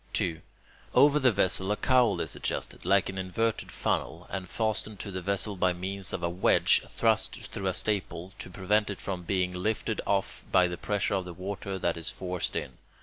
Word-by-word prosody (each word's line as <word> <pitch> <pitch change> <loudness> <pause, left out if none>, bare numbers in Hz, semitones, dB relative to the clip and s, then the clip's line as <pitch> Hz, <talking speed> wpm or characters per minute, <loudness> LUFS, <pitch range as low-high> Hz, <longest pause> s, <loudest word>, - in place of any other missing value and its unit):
2. 80 -3 -1 0.5
Over 145 +1 +6
the 130 -3 +5
vessel 95 -1 +2
a - - +3
cowl 125 -5 +3
is - - -3
adjusted, - - -3
like 95 +1 +4
an 95 0 -4
inverted 110 +5 -1
funnel, 85 +3 -2
and 95 -3 -4
fastened 110 -2 -2
to 100 - -6
the 95 0 -4
vessel 100 +2 +1
by 90 -1 +2
means 95 +2 -3
of 85 - -3
a - - +2
wedge 90 +2 +4
thrust - - +1
through 95 - -5
a 95 - +1
staple, 95 -3 -2
to - - -7
prevent 105 +3 +1
it 100 - -5
from 95 -2 -4
being 90 0 0
lifted 110 +4 -1
off 100 -1 0
by 90 -1 +5
the 90 - -4
pressure 100 +6 -1
of 95 -2 0
the 90 -1 -8
water 95 +1 -4
that 85 -2 0
is 85 - -2
forced 90 -1 -3
in. 65 - -4
95 Hz, 200 wpm, -29 LUFS, 90-105 Hz, 0.5 s, Over